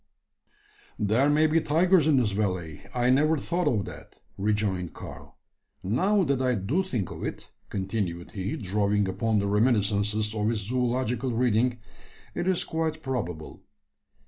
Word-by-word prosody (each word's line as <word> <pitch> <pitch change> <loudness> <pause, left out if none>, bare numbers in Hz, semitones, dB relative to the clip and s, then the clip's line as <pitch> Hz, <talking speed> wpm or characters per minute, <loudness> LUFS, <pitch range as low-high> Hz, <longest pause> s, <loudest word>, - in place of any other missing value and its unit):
"There 110 +7 +2
may 150 +2 +4
be 160 +1 +3
tigers 165 +1 +3
in 150 -3 +4
this 120 -5 +2
valley; 90 -6 -2
I 125 +2 +2
never 155 +4 +3
thought 170 +4 -1
of 110 -8 +1
that," - - -11 0.2
rejoined 100 -4 -1
Karl. - - -10 0.5
"Now 185 - +2
that 140 -4 0
I 125 -1 +2
do 110 - 0
think 125 - -3
of - - -7
it," - - -6 0.2
continued 95 -3 -3
he, 100 +7 -3
drawing 105 -2 +1
upon 110 +3 0
the 100 0 +1
reminiscences 105 -1 +1
of 105 0 0
his 115 -2 -1
zoological 125 0 0
reading, 120 +1 +2 0.6
"it 175 - -2
is 185 -2 +2
quite 160 -1 -2
probable. 90 -12 -4
115 Hz, 145 wpm, -27 LUFS, 100-140 Hz, 0.6 s, may